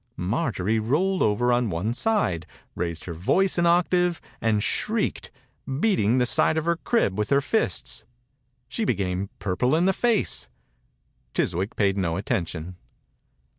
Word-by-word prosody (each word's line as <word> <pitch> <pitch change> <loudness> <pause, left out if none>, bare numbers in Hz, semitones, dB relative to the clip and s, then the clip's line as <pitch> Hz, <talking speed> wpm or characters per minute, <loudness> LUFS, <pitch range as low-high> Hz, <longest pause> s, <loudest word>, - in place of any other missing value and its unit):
Marjorie 110 - 0
rolled 170 - +1
over 120 +4 +2
on 120 -2 +1
one 90 +6 -1
side, 120 - 0 0.3
raised 85 -2 -4
her 85 - -5
voice 180 - +1
an 170 - +3
octave, 175 0 +2 0.2
and 110 -2 +1
shrieked, - - -1 0.5
beating 130 - +2
the 125 - +3
side 120 +7 +2
of 160 - -1
her 170 0 +1
crib 165 - 0
with 105 - -1
her 140 - +4
£sts. 120 - -2 0.6
She 225 - -3
became 95 - -1
purple 115 +9 0
in 170 +3 +2
the 190 - +3
face. 235 -1 0 0.9
Chiswick 95 +5 -1
paid 100 -1 +1
no 85 -3 0
attention. 90 -2 -3
115 Hz, 140 wpm, -25 LUFS, -, 0.9 s, her